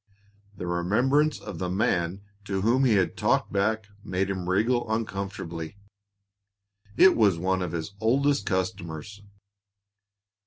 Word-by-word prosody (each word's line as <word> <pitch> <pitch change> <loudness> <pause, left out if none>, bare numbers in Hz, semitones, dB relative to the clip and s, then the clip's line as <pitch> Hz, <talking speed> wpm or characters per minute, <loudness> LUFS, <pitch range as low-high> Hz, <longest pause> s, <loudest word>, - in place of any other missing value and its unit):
The 90 - -5
remembrance 125 - +1
of - - -8
the 90 - -2
man 95 -2 0 0.2
to 95 -2 -2
whom 120 +6 +3
he 120 - +4
had 95 -3 +1
talked - - +1
back 105 +1 0
made 95 -1 -1
him 90 -2 -4
wriggle 110 +4 +1
uncomfortably; 95 -6 -4 1.2
it 190 - +7
was 100 -6 +3
one 95 +2 0
of 90 -3 -3
his 85 +3 -4
oldest 135 +1 +2
customers. 95 +1 -3
100 Hz, 125 wpm, -26 LUFS, 90-110 Hz, 1.2 s, it